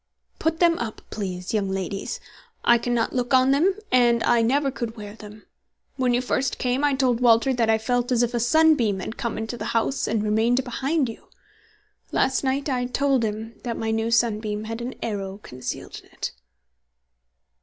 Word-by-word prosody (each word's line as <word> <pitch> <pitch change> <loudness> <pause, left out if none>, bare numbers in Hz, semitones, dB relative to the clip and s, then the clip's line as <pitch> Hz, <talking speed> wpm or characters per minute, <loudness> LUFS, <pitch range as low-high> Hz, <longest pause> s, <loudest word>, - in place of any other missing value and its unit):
"Put 320 0 0
them 340 -1 +4
up, 225 -2 -5
please, 185 -3 -4
young 205 -3 0
ladies. 195 +1 -3 0.5
I 240 0 +6
cannot 240 -1 0
look 250 +1 +1
on 260 +1 +5
them, 340 +8 +3 0.2
and 240 -2 +4
I 240 -1 +4
never 275 +4 +2
could 235 -3 -5
wear 205 -1 -8
them. 210 -1 -12 0.5
When 255 -2 +1
you 245 - +1
first 255 0 -1
came, 255 +2 0
I 290 -2 +3
told 255 -3 +2
Walter 240 +2 +4
that 235 -3 +1
I 220 - +4
felt 245 +3 -1
as 245 -1 +3
if 240 0 -1
a 240 - 0
sunbeam 240 -5 +3
had 220 +4 -5
come 235 -4 -3
into 220 +2 -4
the - - -5
house 265 +4 0
and 220 -1 0
remained 225 +4 +2
behind 270 +3 0
you. 225 - -9 0.8
Last 265 +1 +1
night 270 +2 0
I 250 -3 0
told 270 0 +1
him 220 +1 -4
that 235 -2 -4
my 225 0 -1
new 225 +1 0
sunbeam 215 -2 +1
had 225 +2 -5
an 250 +2 -5
arrow 195 -3 -3
concealed 125 0 -6
in - - -21
it." - - -5
235 Hz, 185 wpm, -24 LUFS, 220-260 Hz, 0.8 s, I